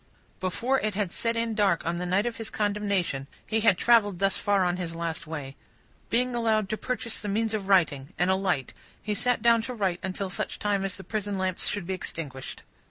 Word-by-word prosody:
Before 235 +8 +1
it 215 -2 -1
had 200 -4 0
set 230 +4 0
in 230 -1 0
dark 200 -5 +2
on 170 +1 -1
the 180 +1 -3
night 190 +4 +2
of 240 -1 -2
his 225 -1 -4
condemnation, 200 -9 0 0.2
he 220 0 0
had 210 -4 +4
travelled 210 -5 +4
thus 195 +1 +2
far 200 -2 +2
on 175 0 0
his 170 -2 -4
last 165 -1 -3
way. 145 -4 -6 0.5
Being 250 +2 +2
allowed 220 -3 +1
to 220 - 0
purchase 240 -2 -3
the 210 - -4
means 220 +2 0
of 205 -3 -2
writing, 155 -7 +3
and 180 +1 +3
a - - +4
light, 180 -9 -1 0.3
he 210 - -2
sat 245 +1 +1
down 235 -1 +5
to 250 +2 -5
write 190 -5 0
until 190 0 -3
such - - -2
time 205 -2 0
as 195 -1 -2
the 190 - -7
prison 205 -2 -3
lamps 185 -1 0
should 205 -4 -2
be 190 - -2
extinguished. 145 -7 -5
200 Hz, 220 wpm, -27 LUFS, 180-220 Hz, 0.5 s, down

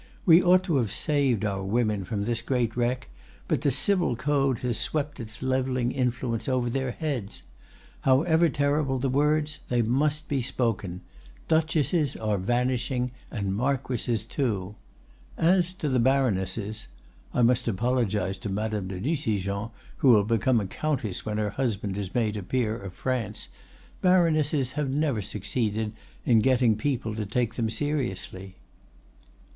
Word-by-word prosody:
We 170 -2 +8
ought 185 +1 +5
to 170 -6 +1
have 115 -6 0
saved 130 -3 +1
our 100 -2 -1
women 105 0 0
from 100 0 -2
this 115 +1 -1
great 120 -2 0
wreck, 125 +1 -1 0.4
but - - 0
the 145 - +2
Civil 175 -1 +1
Code 135 0 +1
has 120 -3 0
swept 145 -2 -2
its 110 0 -7
leveling 130 -1 0
influence 125 -2 -1
over 125 -2 0
their 130 0 -1
heads. 125 -7 -4 0.6
However 160 +5 +4
terrible 145 -1 +1
the 130 +1 0
words, 150 +2 +1
they 120 -1 +2
must 145 +6 0
be 140 -2 0
spoken: 110 -7 -2 0.5
Duchesses 160 -2 +2
are 105 -3 -1
vanishing, 125 +3 0 0.2
and 100 -4 -2
marquises 125 -2 -1
too! 105 -7 -2 0.6
As 180 +1 +3
to 155 - -3
the 130 -3 +2
baronesses—I 110 -2 -1
must 120 +1 +3
apologize 105 -3 0
to 105 - -5
Madame 105 0 -2
de 95 -1 -5
Nucingen, 105 - -1 0.3
who 135 - +4
will 105 -4 +7
become 115 +3 +2
a 100 - -2
countess 115 -4 -2
when 105 0 -1
her 105 -1 0
husband 105 -5 -2
is 100 -2 -5
made 110 -3 +1
a 105 - -3
peer 110 +2 -1
of 100 -4 -8
France—baronesses 145 - 0
have 145 -1 -2
never 140 -5 0
succeeded 105 +2 -2 0.3
in 115 -3 +5
getting 125 -1 +3
people 115 -1 -2
to 105 -1 -4
take 120 +1 0
them 115 -2 -1
seriously." 110 -7 -3
120 Hz, 145 wpm, -27 LUFS, 105-140 Hz, 0.6 s, We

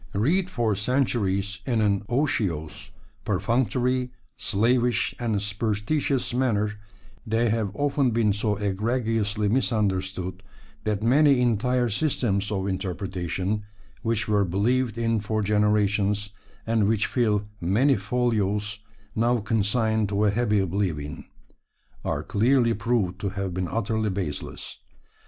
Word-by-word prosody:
Read 170 - +2
for 120 - 0
centuries 100 -3 0
in 120 -4 0
an 100 -2 +2
otiose, 100 - -1 0.3
perfunctory, 125 +2 0 0.3
slavish, 120 +4 +1
and 115 -4 0
superstitious 110 +7 0
manner, 110 -5 +1 0.5
they 115 +1 +2
have 110 -2 0
often 145 -2 +1
been 110 -3 +2
so 105 +1 0
egregiously 105 +1 0
misunderstood 95 -6 0 0.4
that 105 -1 -1
many 140 +3 +5
entire 125 +1 +2
systems 110 -5 0
of 95 -2 -1
interpretation 95 +1 -2 0.4
which 110 -2 0
were 105 -2 +3
believed 115 +6 0
in 115 -1 +1
for 110 +1 -1
generations, 105 0 +1 0.3
and 110 -2 +2
which 110 -1 +2
fill 105 -4 +1
many 115 +11 +3
folios, 105 -1 -1 0.4
now 120 +2 +2
consigned 110 0 +1
to 105 +1 +1
a 105 - +4
happy 105 -1 +1
oblivion 90 -6 -2 0.8
are - - -2
clearly 120 +2 +3
proved 105 -4 -1
to 100 - -1
have 95 -1 -4
been 90 0 -2
utterly 110 +1 -1
baseless. 95 -7 -5
105 Hz, 115 wpm, -25 LUFS, 100-120 Hz, 0.8 s, many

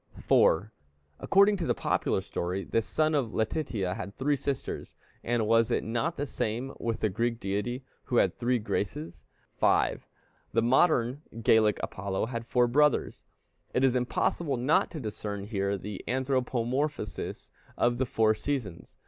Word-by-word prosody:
4. 100 +7 +3 0.5
According 200 +1 +4
to 170 - -3
the - - +2
popular - - 0
story, 90 +3 -3
this 115 -1 0
son 155 0 +1
of 130 -7 0
Letitia 110 - -1
had 100 -1 -6
three 145 +2 +1
sisters; 140 0 -4 0.3
and 120 -2 0
was 115 +1 +3
it - - 0
not 120 +10 -1
the 145 - -1
same 125 0 -3
with 115 -1 -2
the - - +3
Greek 115 +4 -1
deity, 105 +7 -2 0.2
who 125 - -2
had - - +4
the - - -36
three 125 +1 +1
Graces? 85 -7 -3 0.4
5. - - +2 0.5
The 115 +1 +3
modern 130 0 +3 0.2
Gallic 110 -1 +4
Apollo 95 +1 -2
had 115 0 -5
four 125 -1 +3
brothers. 145 +3 +2 0.5
It 125 - +2
is 130 -2 +4
impossible 130 +3 0
not 130 +6 +2
to 165 - -6
discern 105 -4 -5
here 100 -2 -1
the 100 +1 -7
anthropomorphosis 130 -1 -2 0.3
of 120 0 +2
the 130 - +1
four 110 -1 +3
seasons. 110 -7 -4
120 Hz, 155 wpm, -29 LUFS, 105-130 Hz, 0.5 s, According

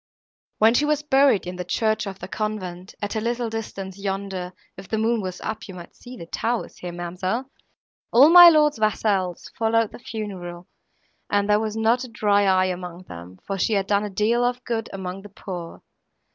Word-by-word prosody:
When 220 +2 +5
she 270 - +3
was 300 0 +1
buried 275 -7 +3
in 180 0 -6
the 180 - -3
church 220 +2 0
of 195 -1 -6
the - - -8
convent, 190 -4 -5
at 205 - -3
a 220 - -1
little 235 0 -2
distance 200 -4 -6
yonder, 195 -2 -4 0.2
if 190 0 -11
the 220 - -1
moon 225 +1 +1
was 185 -2 -5
up 220 - -5
you 190 - -9
might 175 -1 -11
see 250 +1 -11
the 170 - -8
towers 230 +7 -3
here, 180 - -6
ma'amselle, 185 +9 -4 0.6
all 270 +6 +7
my 350 0 +11
lord's 300 -5 +3
vassals 200 -4 0
followed 225 -1 +2
the - - -11
funeral, 185 -7 -7 0.6
and 205 0 +1
there 210 0 +4
was 220 0 -3
not 230 +3 +2
a - - -6
dry 205 -3 +2
eye 185 -1 +4
among 180 0 -8
them, 90 - -11
for 195 -1 -3
she 220 - +1
had 195 -2 +1
done 200 +1 +1
a 210 - -3
deal 215 +5 +1
of 245 +1 -1
good 225 -2 -2
among 190 0 -6
the 205 - -12
poor. 180 -3 -8
205 Hz, 200 wpm, -23 LUFS, 185-230 Hz, 0.6 s, my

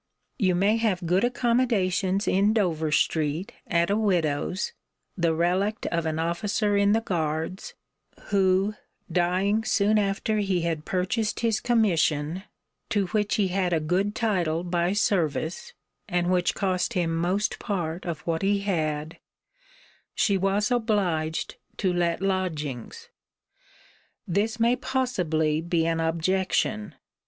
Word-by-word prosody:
You 185 -3 +2
may 200 +5 +3
have 205 -6 0
good 180 +4 +2
accommodations 225 -6 +1
in 200 +3 +3
Dover 165 -8 0
street, 155 +3 0 0.2
at 170 +2 +1
a - - +3
widow's, 180 -4 0 0.4
the 170 -3 +1
relict 185 +6 0
of 170 -1 0
an 155 0 -1
officer 205 +5 0
in 200 0 +4
the 225 - +2
guards, 165 -2 -3 0.5
who 195 0 +2 0.4
dying 185 +5 +1
soon 215 -1 +2
after 205 +2 0
he 190 -3 0
had 165 -2 -2
purchased 190 +4 -1
his 225 -2 +1
commission 180 -6 +1 0.4
(to 205 -2 +1
which 210 -2 0
he 200 -3 +1
had 180 -1 0
a 165 - +2
good 185 +7 0
title 175 -7 0
by 175 +1 0
service, 180 - -1 0.4
and 175 -1 +1
which 180 -2 +1
cost 190 +3 0
him 170 -4 0
most 180 +5 0
part 175 -5 -3
of 170 -4 -4
what 165 -1 -2
he 200 0 +1
had) 160 -4 -2 1.0
she 200 - +2
was 195 +4 +1
obliged 190 -10 0 0.2
to 185 -2 +1
let 175 +1 0
lodgings. 155 -10 -3 1.2
This 210 +5 0
may 235 +2 +4
possibly 180 - 0
be 170 -1 0
an 165 0 0
objection. 185 +6 0
185 Hz, 130 wpm, -26 LUFS, 165-205 Hz, 1.2 s, in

